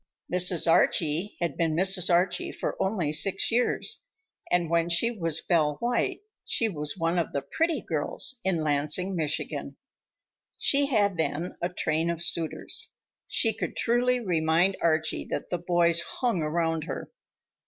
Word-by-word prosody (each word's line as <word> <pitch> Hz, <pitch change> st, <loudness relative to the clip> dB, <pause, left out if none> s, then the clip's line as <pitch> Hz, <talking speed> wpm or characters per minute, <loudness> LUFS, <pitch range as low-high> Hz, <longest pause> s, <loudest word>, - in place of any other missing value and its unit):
Mrs. 180 Hz, -2 st, +3 dB
Archie 165 Hz, +3 st, +2 dB
had 170 Hz, -5 st, -1 dB
been 165 Hz, -2 st, 0 dB
Mrs. 185 Hz, 0 st, +4 dB
Archie 175 Hz, +1 st, +1 dB
for -, -, -4 dB
only 190 Hz, -6 st, 0 dB
six 190 Hz, +8 st, +3 dB
years, 245 Hz, -, +1 dB, 0.5 s
and 175 Hz, -1 st, +1 dB
when 170 Hz, +1 st, +1 dB
she 175 Hz, +8 st, +3 dB
was 165 Hz, -8 st, 0 dB
Belle 155 Hz, -4 st, +1 dB
White 240 Hz, -, -1 dB, 0.2 s
she 230 Hz, -, 0 dB
was 150 Hz, -6 st, -4 dB
one 165 Hz, +1 st, 0 dB
of 165 Hz, -, -3 dB
the 140 Hz, -, -2 dB
"pretty" 325 Hz, -, -1 dB
girls 260 Hz, -, 0 dB
in 185 Hz, -4 st, 0 dB
Lansing, 155 Hz, +5 st, +1 dB
Michigan. 150 Hz, -3 st, -3 dB, 0.8 s
She 280 Hz, 0 st, +2 dB
had 205 Hz, -8 st, +1 dB
then 160 Hz, +2 st, -2 dB
a 175 Hz, -, 0 dB
train 165 Hz, -1 st, -1 dB
of 170 Hz, 0 st, -3 dB
suitors. 170 Hz, -, -2 dB, 0.3 s
She 225 Hz, -2 st, +2 dB
could -, -, -5 dB
truly 245 Hz, +1 st, +1 dB
remind 175 Hz, -2 st, +1 dB
Archie 160 Hz, -1 st, 0 dB
that -, -, -4 dB
"the 175 Hz, -, -1 dB
boys 170 Hz, -1 st, +2 dB
hung 230 Hz, 0 st, -2 dB
around 165 Hz, 0 st, -1 dB
her." -, -, -6 dB
170 Hz, 150 wpm, -27 LUFS, 160-195 Hz, 0.8 s, Mrs